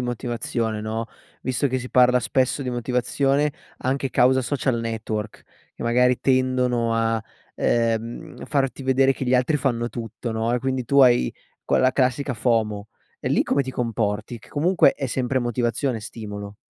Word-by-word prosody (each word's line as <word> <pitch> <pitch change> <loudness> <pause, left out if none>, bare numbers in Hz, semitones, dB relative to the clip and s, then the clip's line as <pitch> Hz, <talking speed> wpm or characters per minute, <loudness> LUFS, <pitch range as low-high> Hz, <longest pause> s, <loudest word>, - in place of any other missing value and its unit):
motivazione 120 -2 -2
no, 110 +1 -3 0.4
visto 130 +2 0
che 130 +1 -1
si 125 - -7
parla 125 0 +5
spesso 130 +3 0
di 130 - -4
motivazione, 135 +4 0 0.3
anche 135 +1 -1
causa 130 +1 +4
social 125 -2 -1
network, 110 -2 -4 0.3
che - - -8
magari 125 +1 +3
tendono 125 -3 +1
a, 115 -1 +1 0.3
ehm, 115 0 -1
farti 135 -2 -1
vedere 135 +1 +3
che 130 - -5
gli 125 +1 +2
altri 130 +5 +2
fanno 120 -4 -1
tutto, 115 0 -6
no, 110 +1 -1
e 125 - +2
quindi 130 0 -2
tu 140 +4 +2
hai 120 - +5 0.3
quella 130 -1 +3
classica 130 +1 0
FOMO, 110 -3 0 0.3
e - - -2
lì - - +3
come 140 - +1
ti 130 - -5
comporti? 115 -2 -2
Che - - -18
comunque 165 0 +3
è 135 - -3
sempre 130 +1 -1
motivazione, 120 +1 -1
stimolo. 105 -1 -8
125 Hz, 160 wpm, -23 LUFS, 115-130 Hz, 0.4 s, parla